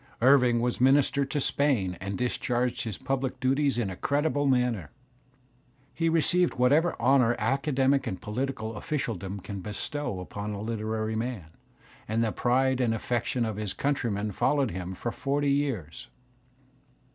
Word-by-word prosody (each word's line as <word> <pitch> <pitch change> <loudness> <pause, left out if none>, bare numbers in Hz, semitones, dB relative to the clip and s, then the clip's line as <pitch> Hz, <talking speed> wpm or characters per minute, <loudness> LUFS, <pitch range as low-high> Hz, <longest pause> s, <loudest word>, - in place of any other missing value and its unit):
Irving 125 -2 +5
was 120 0 -1
minister 140 +1 +4
to 145 +2 -2
Spain 130 -11 +1
and 100 0 -3
discharged 125 +1 -1
his 110 -4 -4
public 130 -1 -2
duties 135 +1 +1
in 110 -5 -1
a - - -6
creditable 145 - 0
manner. 125 - +1 1.0
He 165 -1 +1
received 175 +2 +2
whatever 145 +7 +3
honour 125 -1 +4
academic 135 +3 +1
and 95 - -3
political 115 0 -3
officialdom 100 - -3
can 100 +1 -6
bestow 105 +2 -4
upon 105 +3 -5
a 100 - -5
literary 110 0 -2
man, 110 -8 -4 0.6
and 110 +2 +1
the 110 - 0
pride 130 +2 +1
and 115 -2 +2
aflFection 120 +1 -1
of 110 -2 -4
his 105 -3 -2
countrymen 110 -7 -1
followed 135 +4 +1
him 90 +1 -5
for 120 - -3
forty 140 +2 0
years. 130 - -2
125 Hz, 145 wpm, -28 LUFS, 110-135 Hz, 1.0 s, Irving